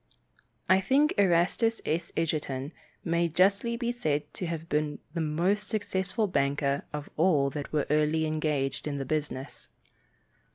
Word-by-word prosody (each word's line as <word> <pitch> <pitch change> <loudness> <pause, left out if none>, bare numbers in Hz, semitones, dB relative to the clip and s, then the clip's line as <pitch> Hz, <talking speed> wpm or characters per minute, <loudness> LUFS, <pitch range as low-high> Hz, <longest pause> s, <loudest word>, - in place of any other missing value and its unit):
I 190 +1 +5
think 280 +9 +3
Erastus 195 +5 +3
S. 165 +3 -1
Edgerton 150 -3 -2 0.3
may 170 0 +1
justly 200 +7 +2
be 240 -1 -1
said 150 -11 0
to 180 - -4
have 165 -1 -4
been 150 -2 0 0.2
the 170 - -1
most 175 +7 0
successful 205 -1 -1
banker 140 -4 0
of 150 -1 -5
all 150 -5 +3
that 145 -1 -5
were 150 -2 +1
early 155 +1 +2
engaged 150 -3 -1
in 145 -1 -2
the 135 - -3
business. 145 -2 -4
160 Hz, 140 wpm, -28 LUFS, 150-190 Hz, 0.3 s, I